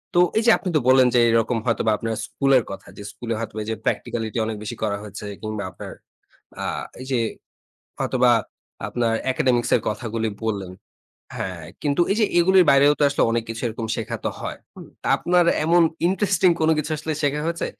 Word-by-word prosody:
তো - - +5 0.2
এইযে 230 +1 +5
আপনি 190 - -4
তো - - +5
বললেন 130 -1 +6
যে - - +6
এরকম 115 +1 +2
হয়তোবা 115 -2 +1
আপনার 115 0 -3
স্কুলের 135 -3 +2
কথা 95 - -9
যে 100 - -8
স্কুলে 115 -1 -5
হয়তোবা 110 -1 -5
যে 110 - -1
প্র্যাকটিক্যালিটি 110 -1 -2
অনেক 110 -1 -4
বেশি 115 +3 -5
করা 100 -2 0
হয়েছে 105 0 -8 0.2
কিংবা 110 -1 -4
আপনার 95 - -9 0.7
আ - - -3 0.4
এই 130 - -7
যে 130 - +1 0.8
হয়তোবা 125 -1 +3 0.6
আপনার 120 -2 0 0.2
একাডেমিক্স 130 -4 +1
এর 120 - +1
কথাগুলি 110 +1 -3 0.2
বললেন 100 -4 -3 0.7
হ্যাঁ, 90 -4 -5 0.2
কিন্তু 145 +2 +1
এই - - -1
যে - - +5
এগুলির 185 +1 +5
বাইরেও 140 +1 +6
তো - - 0
আসলে 140 - 0
অনেক 115 0 0
কিছু 115 0 -6
এরকম 115 0 -4
শেখা 110 - -4
তো - - 0
হয়। - - -5 0.2
হু? - - -10 0.2
তা - - -3
আপনার 175 0 +2 0.2
এমন 170 +2 +4 0.3
ইন্টারেস্টিং 190 -1 +2
কোনো 160 0 +4
কিছু 155 +1 -2
আসলে 155 +1 -4
শেখা 145 0 0
হয়েছে 170 0 -2
120 Hz, 185 wpm, -23 LUFS, 110-150 Hz, 0.8 s, বললেন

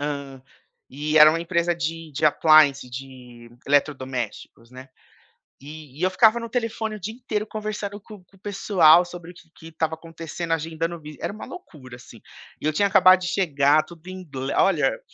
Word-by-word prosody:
Hã, 140 -2 -5 0.5
e 150 +3 0
era 155 0 +9
uma 165 - -2
empresa 170 0 0
de 165 -1 -5
de 155 - -2
appliance, 150 -3 +4
de 125 -2 -11 0.2
eletrodomésticos, 130 -4 -2
né. 130 +1 -12 0.8
E 150 0 -11
eu 185 - +2
ficava 220 +4 +4
no 230 - -6
telefone 225 -2 -3
o - - -12
dia 215 +4 -6
inteiro 220 -3 -4
conversando 210 -1 -5
com 205 -2 -14
com 195 - -25
o - - -24
pessoal 180 -4 +4
sobre 175 -1 -10
o - - -26
que 170 -1 -18
que 160 - -15
estava 160 0 -2
acontecendo, 165 +1 -7
agendando 165 +1 -3
vi 150 -1 -11
era - - -3
uma 215 - -9
loucura 145 - -12
assim. 120 -2 -15 0.4
E - - -5
eu 155 - +2
tinha 200 +6 +1
acabado 185 -1 +6
de 180 - -4
chegar, 150 -5 +2
tudo 170 -1 -16
em 185 0 -8
ingle 135 -4 -6
olha, - - +2
165 Hz, 180 wpm, -23 LUFS, 145-185 Hz, 0.8 s, era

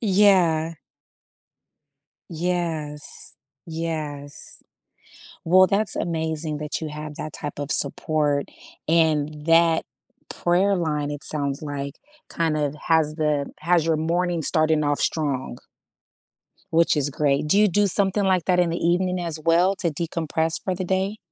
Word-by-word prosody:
Yeah. 185 -6 +3 1.5
Yes. 165 -3 -1 0.3
Yes. 155 -4 -2 0.8
Well, 185 +3 +6
that's 200 0 0
amazing 160 -2 -2
that 150 +1 -4
you 155 - -4
have 150 0 -7
that 155 -1 -6
type 145 -1 -6
of 145 0 -3
support, 145 0 0 0.4
and 155 -2 +1
that 165 0 +4 0.5
prayer 185 +3 +1
line, 150 -4 -1
it 145 -1 -6
sounds 140 -1 0
like, 140 -2 -5 0.3
kind 160 -2 0
of, 145 -1 -1
has 160 -2 +2
the 150 -3 0
has 170 0 +2
your 165 -1 +1
morning 170 +2 0
starting 155 0 +2
off 145 0 0
strong 140 -6 -1 1.2
which 165 -1 +3
is 145 -1 +1
great. 145 +1 0
Do 175 - +4
you 210 0 +5
do 205 +3 +2
something 200 +1 +1
like 185 -3 +2
that 180 -1 +2
in 175 -1 +3
the 170 - -2
evening, 180 +1 +1
as 165 -3 -4
well, 170 +4 +3
to 175 - +1
decompress 160 0 -1
for 185 - -2
the 185 - -4
day? 190 +3 -1
160 Hz, 140 wpm, -23 LUFS, 150-175 Hz, 1.5 s, Well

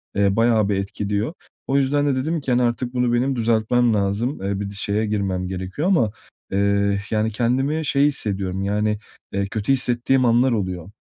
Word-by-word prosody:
eee, 100 -1 +2
bayağı 115 -2 +3
bir 100 - +1
etkiliyor. 100 - -2 0.3
O 135 - +2
yüzden 145 +1 +2
de 140 - +2
dedim 155 +5 -1
ki, 135 - -2
hani, 125 0 +3
"Artık 120 +1 -1
bunu 125 -1 +1
benim 130 +3 +1
düzeltmem 115 0 +2
lazım, 105 +6 -1
eee, 100 0 -2
bir 100 - -3
şeye 105 +2 0
girmem 95 -3 -1
gerekiyor." 95 - -3
ama, 120 - +3 0.4
eee, 100 0 +1
yani, 110 0 +1
kendimi 135 +8 0
şey 140 0 +3
hissediyorum, 95 -8 -1
yani, 105 +1 0 0.4
eee, 100 0 0
kötü 110 +5 -2
hissettiğim 130 0 +2
anlar 120 +2 +4
oluyor. 95 -4 -3
110 Hz, 175 wpm, -22 LUFS, 100-125 Hz, 0.4 s, anlar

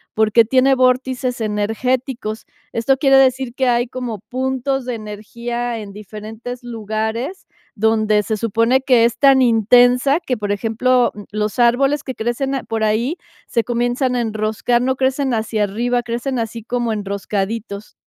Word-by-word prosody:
porque 220 +1 +4
tiene 260 +3 +3
vórtices 255 -1 +1
energéticos. 220 +2 -2 0.3
Esto 265 +4 +1
quiere 270 0 +4
decir 260 -1 +2
que 260 -1 +1
hay 240 0 +2
como 245 -4 -5
puntos 265 +1 -2
de 250 - -3
energía 235 +3 -5
en 205 -2 -8
diferentes 215 +4 -8
lugares, 225 - -4 0.3
donde 215 -1 +2
se 215 +1 -2
supone 230 +4 +2
que 250 -4 +4
es 235 - 0
tan 275 -2 +6
intensa 245 +4 +4
que, 255 -8 -3
por 205 -1 -3
ejemplo, 235 +4 +2
mm, 205 - -9
los 210 0 -2
árboles 270 +5 +3
que 260 - -5
crecen 240 +4 -2
a 265 - -3
por 225 -1 -3
ahí 235 +10 0 0.3
se 230 - 0
comienzan 245 +2 0
a 240 - +1
enroscar, 220 +2 0
no 260 0 +1
crecen 265 0 0
hacia 220 -1 -1
arriba, 240 +4 -1
crecen 240 +2 -3
así 230 0 -4
como 240 -1 -1
enroscaditos. 200 +1 -4
240 Hz, 155 wpm, -19 LUFS, 220-255 Hz, 0.3 s, tan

